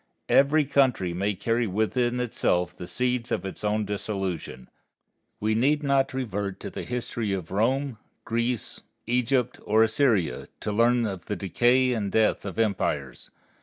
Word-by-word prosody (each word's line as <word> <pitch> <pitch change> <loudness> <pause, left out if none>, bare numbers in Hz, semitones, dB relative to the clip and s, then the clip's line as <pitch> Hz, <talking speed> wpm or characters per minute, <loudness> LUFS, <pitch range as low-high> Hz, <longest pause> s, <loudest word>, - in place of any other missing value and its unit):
Every 145 +2 +4
country 130 -10 +2
may 100 +3 -1
carry 115 +4 0
within 120 +5 0
itself 90 -7 0
the 90 - -8
seeds 125 +1 -1
of - - -1
its 95 - -6
own 105 0 0
dissolution. 95 - -4 0.7
We 110 +1 +1
need 145 +7 +2
not 140 -1 +2
revert 100 -6 -3
to - - -6
the - - -5
history 120 -4 -2
of 90 -4 -4
Rome, 125 +4 0 0.3
Greece, 115 0 -2 0.2
Egypt, 125 +1 0
or 110 +2 +4
Assyria 110 - +1
to 105 - -2
learn 120 +2 +3
of 95 -4 -5
the 105 - -2
decay 120 +7 +2
and 105 -4 -2
death 110 -2 +2
of 95 - -6
empires. 85 - -1
110 Hz, 150 wpm, -26 LUFS, 100-125 Hz, 0.7 s, Every